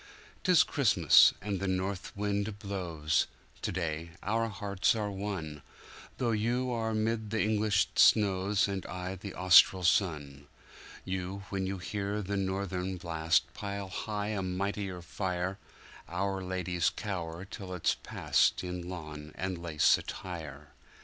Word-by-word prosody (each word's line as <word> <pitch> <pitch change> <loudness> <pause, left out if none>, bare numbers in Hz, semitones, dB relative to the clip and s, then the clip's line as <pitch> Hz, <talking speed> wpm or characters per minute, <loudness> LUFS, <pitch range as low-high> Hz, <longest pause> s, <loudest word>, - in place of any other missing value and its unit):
'Tis 180 -4 +6
Christmas, 105 - +6
and 100 -2 -2
the 100 - -2
North 95 +1 -2
wind 100 0 -1
blows; 90 -7 -1 0.3
to - - -2
day 85 -2 -3
our 115 +3 0
hearts 100 0 0
are 105 -2 -2
one, 95 -7 -4 0.6
Though 120 -2 0
you 120 +4 0
are 110 -2 -1
'mid 110 0 -1
the 110 +1 -1
English 105 -1 +2
snows 100 -1 +4
and 100 -1 -3
I 90 +1 -5
in 100 - -6
Austral 90 0 +6
sun; 75 -6 +1 0.6
You, 95 +1 -4
when 95 -1 -1
you 95 0 -3
hear 100 +2 -3
the 100 +1 -2
Northern 95 -1 -2
blast, 85 -1 +1
pile 100 -1 -5
high 105 +1 -3
a 105 -3 -1
mightier 95 0 -3
fire, 90 +2 -3 0.5
Our 95 +2 -2
ladies 90 -2 0
cower 85 -4 -5
until 95 -1 -8
it's 90 - +2
past - - +1
in 90 -1 -5
lawn 75 -4 -7
and 95 0 -2
lace 80 -3 +3
attire. 75 -5 -7
95 Hz, 135 wpm, -31 LUFS, 90-100 Hz, 0.6 s, Tis